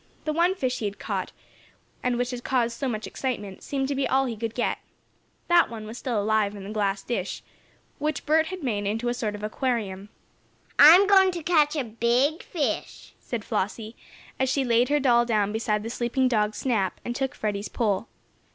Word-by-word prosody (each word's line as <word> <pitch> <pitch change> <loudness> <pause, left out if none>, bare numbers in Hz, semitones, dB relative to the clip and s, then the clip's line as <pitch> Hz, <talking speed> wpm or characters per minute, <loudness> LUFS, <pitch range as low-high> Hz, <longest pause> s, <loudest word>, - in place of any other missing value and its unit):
That 305 - 0
one 345 +4 +2
fish 255 -8 -1
he 220 - -3
had 205 0 -3
caught, - - -3 0.7
and 250 -1 0
which 245 +1 -1
had 245 -1 -6
caused 240 -3 0
so 270 - -1
much 220 -2 -3
excitement, 210 -7 -4
seemed 270 -1 -2
to 285 - -1
be 275 0 0
all 270 +1 +2
he 240 -3 -3
could 225 +1 -4
get. 245 - -1 0.7
That 345 0 +5
one 220 -2 -7
was 220 +2 -8
still 240 -5 -1
alive 210 0 +1
in 200 - -8
the 200 - -7
glass 200 -2 -1
dish, 200 -6 -3 0.6
which 305 -1 -2
Bert 315 +1 +3
had 370 -1 -6
made 205 -6 -1
into 225 +4 -1
sort 225 -4 -3
of 210 - -8
an - - 0
aquarium. 210 -4 -2 0.7
"I'm 335 +7 +9
going 385 -1 +6
to 340 -2 -5
catch 305 -2 +3
a 290 - 0
big 240 - +1
fish," 315 -6 -3
said 230 -4 -5
Flossie, 215 +3 -3 0.4
as 265 0 +2
she 270 +1 +1
laid 240 +1 +3
her 295 0 +3
doll 240 -3 +4
down 210 -4 +1
beside 215 -1 -1
the 225 - -4
sleeping 245 +2 0
dog 215 -3 +1
Snap, 215 -8 -1
and 240 - -3
took 270 0 -2
Freddie's 205 -1 -3
pole. 215 -2 -1
240 Hz, 200 wpm, -26 LUFS, 215-275 Hz, 0.7 s, I'm